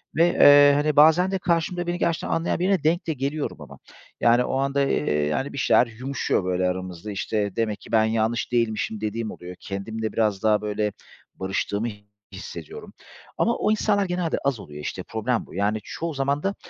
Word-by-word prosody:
ve, 165 +3 +5
eee, 145 0 +8
hani, 150 +1 +1
bazen 160 +5 +5
de 195 - 0
karşımda 175 0 -1
beni 175 - -1
gerçekten 170 -2 -1
anlayan 165 +1 0
birine 185 -2 +1
denk 170 +4 +1
de 160 - 0
geliyorum 140 +2 -3
ama - - -11 0.4
yani 120 +1 +4
o 130 - -2
anda, 140 +1 0
eee, 75 - +1
yani 130 - -2
bir - - -7
şeyler 125 -2 +4
yumuşuyor, 125 -2 -2
böyle, 90 0 0
aramızda, 90 +2 -5
işte, 100 0 -2
demek 110 -2 -1
ki - - -13
ben 110 -1 +4
yanlış 115 +2 -1
değilmişim 110 -2 -1
dediğim 110 +1 -3
oluyor. 90 +1 -9
Kendimle 110 +3 -5
biraz 105 -3 0
daha, 105 -1 +3
böyle, 105 0 -1 0.4
barıştığımı 100 +3 -2 0.5
hissediyorum 85 -4 -9 0.4
ama 235 - +2
o - - +1
insanlar 205 -2 +1
genelde 180 -2 -1
az 135 -4 0
oluyor, 75 -5 -9
işte, - - -5
problem 115 +1 -2
bu - - -15
yani 105 +3 0
çoğu 165 -1 -5
zaman 140 +1 -1
da, 195 +1 -1
120 Hz, 185 wpm, -24 LUFS, 105-155 Hz, 0.5 s, eee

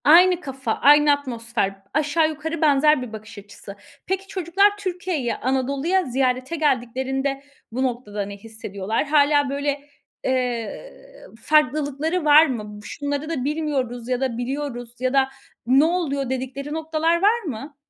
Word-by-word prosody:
Aynı 355 +3 +6
kafa, 270 -5 -4
aynı 295 +1 +5
atmosfer, 230 -8 -3
aşağı 310 +1 +2
yukarı 315 +1 -5
benzer 300 -1 +4
bir 245 -3 -7
bakış 215 0 -10
açısı. 205 0 -11 0.3
Peki, 385 +1 -2
çocuklar 390 +1 +2
Türkiye'yi, 355 -9 -2
Anadolu'ya 275 +8 0
ziyarete 255 +3 0
geldiklerinde 270 -1 -1 0.3
bu 255 +3 -1
noktada 235 -5 -3
ne 200 0 -8
hissediyorlar? 220 +1 -4
Hâlâ 290 -1 +3
böyle, 285 +1 -1 0.4
eee, 250 - -2 0.5
farklılıkları 305 +3 +1
var 300 +2 +8
mı? 250 -8 -3
"Bu 210 0 -10
şunları 285 +5 -4
da 300 -7 -2
bilmiyoruz 270 -5 -2
ya 250 0 0
da 255 -4 -1
biliyoruz 245 -2 -4
ya 255 +1 0
da 270 -1 +3 0.4
ne 265 +4 +5
oluyor?" 295 -6 -1
dedikleri 265 +3 -4
noktalar 320 +1 0
var 430 +4 +4
mı? 285 - -6
275 Hz, 135 wpm, -23 LUFS, 250-310 Hz, 0.5 s, var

